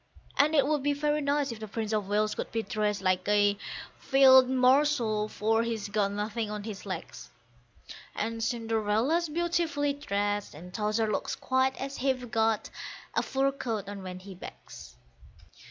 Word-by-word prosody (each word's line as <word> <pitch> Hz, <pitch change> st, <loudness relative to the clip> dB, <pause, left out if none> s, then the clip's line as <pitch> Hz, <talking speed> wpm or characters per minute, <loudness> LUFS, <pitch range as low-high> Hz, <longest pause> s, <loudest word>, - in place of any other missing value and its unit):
And 300 Hz, +3 st, +3 dB
it 280 Hz, -3 st, +5 dB
would 300 Hz, 0 st, +1 dB
be 290 Hz, +1 st, +1 dB
very 295 Hz, +1 st, 0 dB
nice 285 Hz, -1 st, 0 dB
if 230 Hz, -, -7 dB
the 215 Hz, -, -6 dB
Prince 220 Hz, +1 st, -3 dB
of 210 Hz, -2 st, 0 dB
Wales 210 Hz, +1 st, +1 dB
could -, -, -5 dB
be 225 Hz, -1 st, -1 dB
dressed 210 Hz, -1 st, -1 dB
like 185 Hz, 0 st, +1 dB
a 205 Hz, 0 st, +4 dB, 0.4 s
Field 260 Hz, -2 st, +6 dB
marshal, 255 Hz, -4 st, +3 dB
for 225 Hz, +2 st, +1 dB
he's 225 Hz, -3 st, -3 dB
got 205 Hz, -1 st, +1 dB
nothing 210 Hz, +2 st, -3 dB
on 210 Hz, -1 st, -5 dB
his 210 Hz, -2 st, -7 dB
legs; -, -, -6 dB, 0.9 s
And 225 Hz, +1 st, -2 dB
Cinderella's 230 Hz, +8 st, 0 dB
beautifully 325 Hz, -3 st, 0 dB
dressed, 205 Hz, -, -2 dB
and 180 Hz, +4 st, -11 dB
Towser 215 Hz, +1 st, 0 dB
looks -, -, -2 dB
quite 260 Hz, 0 st, 0 dB
as 275 Hz, +1 st, -5 dB
if 265 Hz, -1 st, +1 dB
he'd 245 Hz, -2 st, -9 dB
got 225 Hz, -1 st, +1 dB, 0.4 s
a -, -, +2 dB
fur 270 Hz, +1 st, 0 dB
coat 225 Hz, -7 st, -4 dB
on 200 Hz, -1 st, -6 dB
when 185 Hz, -1 st, -7 dB
he 190 Hz, +1 st, -10 dB
begs. 65 Hz, -, -11 dB
225 Hz, 170 wpm, -29 LUFS, 210-270 Hz, 0.9 s, Field